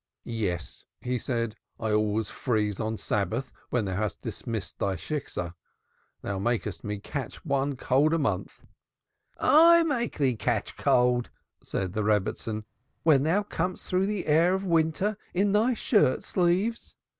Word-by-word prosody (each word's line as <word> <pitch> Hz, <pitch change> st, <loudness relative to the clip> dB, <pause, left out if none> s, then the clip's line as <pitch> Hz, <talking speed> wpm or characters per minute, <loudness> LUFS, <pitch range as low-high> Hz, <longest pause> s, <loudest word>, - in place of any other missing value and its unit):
"Yes," 100 Hz, -8 st, -3 dB, 0.2 s
he 125 Hz, 0 st, -1 dB
said 115 Hz, -2 st, -2 dB, 0.2 s
now, -, -, -5 dB
"I 110 Hz, -, +1 dB
always 105 Hz, 0 st, +1 dB
freeze 105 Hz, -5 st, -1 dB
on 110 Hz, 0 st, -2 dB
Shabbos 110 Hz, +7 st, -2 dB, 0.2 s
when 120 Hz, -4 st, 0 dB
thou 95 Hz, -1 st, -2 dB
hast 105 Hz, 0 st, -2 dB
dismissed 110 Hz, -3 st, -5 dB
thy 95 Hz, -1 st, 0 dB
Shiksah. 90 Hz, -, -4 dB, 0.7 s
Thou 100 Hz, -1 st, -2 dB
makest 110 Hz, -2 st, -1 dB
me 105 Hz, 0 st, -3 dB
catch 130 Hz, +8 st, -6 dB
one 140 Hz, -1 st, 0 dB
cold 145 Hz, +6 st, +3 dB
a -, -, +2 dB
month." 145 Hz, -, -2 dB, 0.7 s
"I 335 Hz, +2 st, +7 dB
make 255 Hz, -8 st, -1 dB
thee 135 Hz, -4 st, +2 dB
catch -, -, -1 dB
cold!" 125 Hz, -1 st, +2 dB, 0.3 s
said 95 Hz, -1 st, -3 dB
the 110 Hz, -, -1 dB
Rebbitzin. 105 Hz, +1 st, 0 dB, 0.4 s
"When 150 Hz, -5 st, +5 dB
thou 170 Hz, +8 st, +2 dB
comest 180 Hz, -2 st, -3 dB
through 185 Hz, +1 st, +1 dB
the 205 Hz, -3 st, -2 dB
air 165 Hz, +5 st, +4 dB
of 190 Hz, +1 st, -3 dB
winter 170 Hz, +4 st, +1 dB, 0.2 s
in 200 Hz, +2 st, +3 dB
thy 225 Hz, +5 st, +3 dB
shirt 205 Hz, -, +2 dB
sleeves! 190 Hz, +6 st, 0 dB
130 Hz, 150 wpm, -27 LUFS, 110-180 Hz, 0.7 s, I